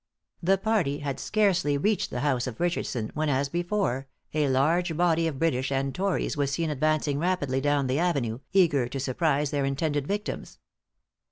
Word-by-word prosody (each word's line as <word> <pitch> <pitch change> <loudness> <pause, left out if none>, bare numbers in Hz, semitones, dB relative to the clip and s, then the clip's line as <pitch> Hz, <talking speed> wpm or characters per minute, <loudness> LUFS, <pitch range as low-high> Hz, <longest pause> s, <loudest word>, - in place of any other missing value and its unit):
The 190 +3 +3
party 195 -9 0
had 140 -2 -3
scarcely 185 -9 +2
reached 205 +6 +1
the 125 - -3
house 130 -4 +1
of 120 -3 -6
Richardson, 155 -10 -1
when, 155 0 -1
as 140 0 +1
before, 175 -6 -1 0.3
a 150 -1 +2
large 160 +5 +2
body 165 -1 +3
of 150 -4 -3
British 135 -4 0
and 135 0 0
tories 195 +1 -1
was 140 -2 0
seen 155 +3 -1
advancing 150 0 +1
rapidly 155 -7 0
down 145 0 +2
the 130 +3 0
avenue, 140 -10 0
eager 155 -10 +3
to 135 +2 -5
surprise 140 +2 0
their 145 -2 0
intended 145 +1 -1
victims. 205 +1 -4
145 Hz, 170 wpm, -27 LUFS, 135-175 Hz, 0.3 s, The